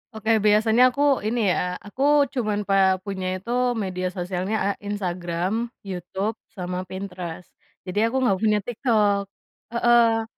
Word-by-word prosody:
Oke 220 0 +2
biasanya 220 +4 +5
aku 280 +2 +2
ini 225 -4 +1
ya, 180 +1 -1
aku 230 +6 -4 0.3
cuman 215 -5 -1
pe 195 - +2 0.3
punya 190 -2 -4
itu 195 +6 -6 0.3
media 185 -1 -2
sosialnya, 185 +3 -3 0.2
eee, 205 - -9
Instagram, 185 +2 -2 0.2
YouTube 190 +3 -4 0.2
sama 180 0 -4
Pinterest. 180 -2 -7 0.3
Jadi 185 +2 -3
aku 230 - -4
nggak 195 -6 +2
punya 210 0 +2
TikTok. 210 -4 +1 0.5
Heeh. 235 -1 +4
205 Hz, 135 wpm, -24 LUFS, 185-225 Hz, 0.5 s, biasanya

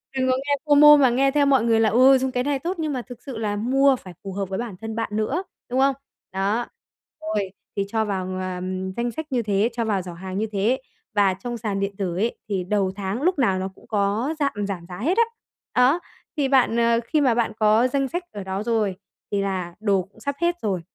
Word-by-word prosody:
đừng 260 -1 +1
có 255 - +2
nghe 285 +2 0
FOMO 295 0 +8
mà 265 -3 +5
nghe 270 +3 +2
theo 290 0 +3
mọi 270 -4 +4
người 230 -1 +3
là 225 -1 +4
"Ừ, 260 +5 +6
dùng 260 0 -1
cái 250 0 0
này 280 0 0
tốt" 350 +4 -3
nhưng 310 -2 -1
mà 255 - -2
thực 245 -1 -12
sự 260 -5 -7
là 210 -2 -1
mua 265 +5 +3
phải 185 -7 -11
phù 195 - -6
hợp 195 -1 -3
với 190 - -3
bản 235 -5 -5
thân 225 0 -5
bạn 225 -1 -2
nữa, 270 - -1 0.3
đúng 255 +2 0
không? 270 0 +4 0.4
Đó. 200 +5 0 0.6
Rồi. 210 -2 -2 0.2
Thì 200 -1 0
cho 220 +1 0
vào, 190 -3 -2
ờm, 185 0 -3
danh 235 +3 -2
sách 315 +5 -6
như 250 -2 +1
thế, 205 +1 +1
cho 230 -1 -1
vào 205 -3 0
giỏ 180 -1 -8
hàng 185 +2 -6
như 220 +1 0
thế 220 +6 +1 0.3
và 200 -2 +4
trong 240 +6 -5
sàn 210 -3 -2
điện 200 0 -2
tử 185 -4 -2
ấy, 225 +5 0
thì 190 -2 -1
đầu 195 0 0
tháng 200 +5 -3
lúc 360 -1 +1
nào 195 -7 +2
nó 190 - -3
cũng - - -20
có 210 +7 0
giạm 205 -9 -1
giảm 180 -4 -5
giá 180 +1 -8
hết 335 - 0
á. 465 - +7 0.5
Á, 255 +7 +4 0.4
thì 280 -2 +2
bạn, 260 -4 +3
ờ, 235 0 +3
khi 300 +4 +1
mà 250 -5 +3
bạn 235 -2 +1
có 215 +3 +4
danh 275 +1 0
sách 350 +6 -3
ở 205 - -6
đó 190 +2 -3
rồi 220 -4 0 0.4
thì 200 -1 +1
là 185 -3 -3
đồ 200 -3 +2
cũng 195 +4 -21
sắp 280 +5 -3
hết 345 0 +2
rồi. 190 -5 -1
225 Hz, 245 wpm, -23 LUFS, 195-265 Hz, 0.6 s, FOMO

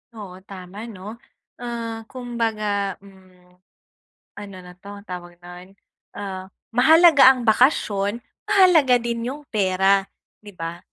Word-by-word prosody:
Oo, 190 -4 -10
tama 195 +4 -9
'no? 210 +2 -10 0.4
Ah, 230 -2 -6
kumbaga 220 -5 -3
hmm, 185 -2 -21 0.8
ano 200 -2 -10
na 180 - -12
'to, 200 +1 -11
tawag 175 -1 -8
no'n, 180 +2 -13 0.4
ah, 190 -2 -6 0.2
mahalaga 310 +4 +6
ang 250 -2 -6
bakasyon, 215 -3 +2 0.3
mahalaga 360 -11 +5
din 235 0 -3
'yong 290 +3 -6
pera, 195 -1 +2 0.4
'di 205 -1 -12
ba? 165 +1 -6
205 Hz, 115 wpm, -22 LUFS, 185-235 Hz, 0.8 s, mahalaga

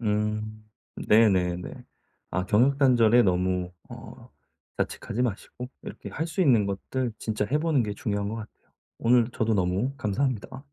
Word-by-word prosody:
음 105 0 -2 0.3
네네네. 95 -5 +2 0.6
아 90 +2 -1
경력단절에 120 0 +4
너무 90 -2 0 0.2
어 - - -11 0.5
자책하지 120 +2 -2
마시고 125 +2 -4
이렇게 - - -8
할 160 - -3
수 165 +3 -3
있는 120 - +4
것들 115 +5 -3
진짜 105 -1 -2
해 150 - +2
보는 155 -4 +2
게 105 -2 -3
중요한 100 -1 -2
것 110 - -4
같아요. 110 -1 -11 0.3
오늘 120 0 +3
저도 110 -1 0
너무 95 +7 0
감사합니다. 130 +3 -2
110 Hz, 295 characters per minute, -26 LUFS, 100-125 Hz, 0.6 s, 경력단절에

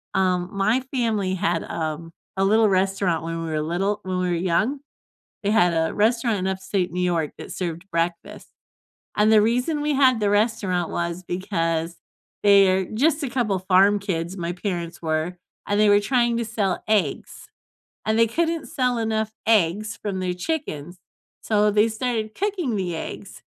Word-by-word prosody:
Um, 180 -2 +1
my 210 +4 +2
family 215 -7 0
had, 175 -3 0
um, 160 0 -4 0.3
a 190 - +2
little 220 +2 +4
restaurant 190 -3 +1
when 165 0 -4
we 165 - -4
were 155 -1 -1
little 190 +6 -1
when 185 -1 -3
we 180 0 0
were - - +1
young. 190 +11 0 0.6
They 205 - 0
had 180 -6 +4
a 160 0 0
restaurant 230 +1 +2
in 185 - -2
Upstate 190 -1 -2
New 180 - -2
York 170 -4 0
that - - -9
served 170 -1 -4
breakfast, 170 0 -3 0.7
and 210 +1 +4
the 215 -1 +6
reason 250 +7 0
we 300 0 0
had 260 -3 +4
the 205 -1 +1
restaurant 205 -5 +1
was 170 +1 -3
because 170 -2 -2 0.5
they're 195 -2 +5
just 295 - +1
a 275 - -2
couple 220 -7 0
farm 195 +2 +4
kids, 180 -2 -3
my 170 0 -3
parents 175 -2 -4
were, 160 +2 -1 0.3
and 205 0 +1
they 210 -1 +5
were 205 0 +6
trying 240 +1 +1
to 235 - -1
sell 210 -4 -1
eggs 215 -2 -1 0.6
and 220 0 +1
they 230 - +5
couldn't 330 +5 -1
sell 250 -3 0
enough 220 -1 -1 0.2
eggs 215 0 +2
from 195 -3 -3
their 180 -1 -1
chickens, 180 - -4 0.4
so 210 -1 +2
they 210 +2 +4
started 220 -1 -3
cooking 370 - -1
the 180 -3 -2
eggs - - -7
195 Hz, 170 wpm, -23 LUFS, 175-220 Hz, 0.7 s, the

